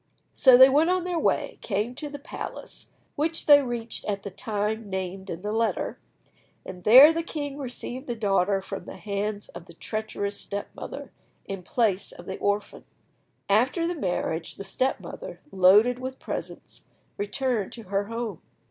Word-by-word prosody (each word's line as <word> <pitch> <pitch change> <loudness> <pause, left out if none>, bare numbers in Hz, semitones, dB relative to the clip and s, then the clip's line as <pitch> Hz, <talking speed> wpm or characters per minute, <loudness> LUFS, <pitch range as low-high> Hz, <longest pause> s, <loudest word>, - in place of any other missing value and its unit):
So 260 -3 +7
they 260 +1 +10
went 295 +5 +3
on 365 -1 +2
their 355 -2 -1
way, - - 0
came 215 +3 -1
to 295 +3 -6
the 285 - -7
palace, 285 - -7 0.3
which 325 +2 -1
they 290 -2 +8
reached 240 -3 -3
at 200 -1 -2
the 200 - -6
time 210 +2 -3
named 190 0 -4
in 170 0 -5
the 210 +1 -3
letter, 225 +1 -1 0.7
and 180 -1 -9
there 265 +8 +10
the 330 - -1
king 290 -4 -5
received 255 0 -6
the 240 - -2
daughter 195 -2 +1
from 195 0 -6
the - - -9
hands 205 0 -3
of 175 0 -10
the - - -14
treacherous 215 -2 -4
step 200 0 -4
mother, - - -8 0.3
in 195 -1 -5
place 200 0 0
of 175 - -12
the 190 - -6
orphan. 205 +1 -1 0.6
After 250 - +2
the 345 - 0
marriage, 175 - -2
the - - -7
step 255 +7 -1
mother, - - -8
loaded 205 +7 +5
with 260 +1 -5
presents, - - -7 0.3
returned 210 0 -1
to 230 - -9
her 200 +1 -1
home. 230 -4 -5
215 Hz, 170 wpm, -26 LUFS, 195-260 Hz, 0.7 s, they